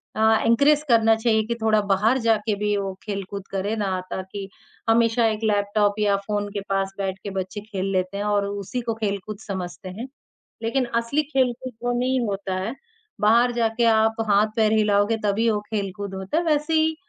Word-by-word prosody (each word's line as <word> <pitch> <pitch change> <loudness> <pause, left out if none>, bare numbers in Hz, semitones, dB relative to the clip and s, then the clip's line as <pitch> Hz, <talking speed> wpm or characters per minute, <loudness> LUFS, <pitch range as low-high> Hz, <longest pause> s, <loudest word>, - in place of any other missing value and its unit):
अ, 220 - -1 0.2
encourage 285 +6 +4
करना 225 -1 +5
चाहिए 220 -1 +2
कि 235 - -1
थोड़ा 220 -1 +3
बाहर 215 +7 +3
जाके 225 -2 +1
भी 210 0 +1
वो 195 -1 -3
खेलकूद 200 -1 -5
करें 195 +3 -1
ना 190 -3 -1
ताकि 190 +1 -5 0.4
हमेशा 230 0 +3
एक 215 0 -2
लैपटॉप 205 -1 +2
या 205 -1 +3
फ़ोन 205 -1 -1
के 200 - -3
पास 195 0 0
बैठकर 195 0 -4
बच्चे 190 +2 -4
खेल 200 -3 -4
लेते 185 +1 -1
हैं 205 - -2
और 205 -1 +1
उसी 205 +4 -4
को 230 -1 -2
खेलकूद 205 -1 -3
समझते 185 -2 -6
हैं। 220 +8 -7 0.6
लेकिन 255 +3 +1 0.2
असली 280 +6 0
खेलकूद 260 -3 -1
वो 245 - +1
नहीं 260 +1 +1
होता 195 -1 -3
है, 190 +6 -3 0.5
बाहर 235 +4 +4
जाके 230 +1 +1
आप 220 0 +3
हाथ-पैर 215 +2 +3
हिलाओगे 210 0 +3
तभी 220 +3 +2
वो 210 - 0
खेलकूद 200 -2 -4
होता 190 +10 -3
है। 340 - +2
वैसे 300 0 +1
ही 315 0 +3
215 Hz, 180 wpm, -23 LUFS, 200-230 Hz, 0.6 s, करना